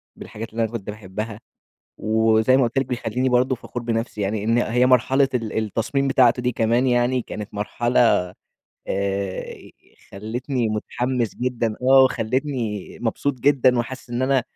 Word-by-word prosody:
بالحاجات 115 +2 -8
اللي 115 +1 -1
أنا 110 - -2
كنت 105 -3 -6
باحبها، 105 +1 -6 0.6
وزي 110 +3 +3
ما 135 - +4
قُلت 120 +3 -2
لِك 135 - -1
بيخليني 125 +1 -1
برضه 125 +1 +2
فخور 120 +1 -7
بنفسي 115 -2 -2
يعني 100 +1 -1
إن 115 +2 +2
هي 125 +1 +2
مرحلة 130 +2 +3
ال 115 -3 -2
التصميم 115 +6 -1
بتاعته 125 -2 +4
دي 125 - 0
كمان 120 +3 +1
يعني 125 0 +2
كانت 105 -1 -8
مرحلة 110 +4 0 0.9
آآ 100 -1 -2 0.6
خلتني 120 +4 -3
متحمس 120 +2 -2
جدًا، 120 -3 -1
آه 135 +1 +6
وخلتني 125 -4 -2
مبسوط 125 +4 -1
جدًا، 130 -2 +3
وحاسس 125 +1 -5
إن 120 +1 -1
أنا 130 -1 +2
120 Hz, 150 wpm, -22 LUFS, 110-130 Hz, 0.9 s, آه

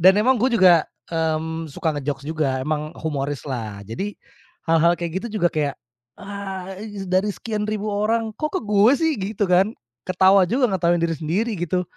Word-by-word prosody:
Dan 190 +2 +7
emang 255 +1 +3
gue 250 +2 +2
juga, 180 -6 +6 0.2
mmm, 160 0 -1
suka 155 +1 -2
nge-jokes 140 0 -4
juga, 150 -4 -1
emang 155 +2 -2
humoris 145 -3 -3
lah. 110 -6 -5
Jadi, 195 - -4 0.5
hal-hal 165 +1 +4
kayak 170 +2 -3
gitu 220 -2 -4
juga 175 - +4
kayak, 145 -3 -1 0.4
"Ah 195 -2 -6 0.4
dari 185 +3 +1
sekian 215 -2 -3
ribu 215 0 -2
orang, 220 +2 0
kok 305 +2 -2
ke - - +1
gue 210 +3 +4
sih?" 320 +2 +1
Gitu 205 +2 -1
kan. 190 +4 +3 0.3
Ketawa 190 +1 +5
juga, 245 +3 +2
ngetawain 175 -2 +1
diri 165 -1 +1
sendiri 190 +10 -1
gitu. 175 +2 0
185 Hz, 170 wpm, -22 LUFS, 160-210 Hz, 0.5 s, Dan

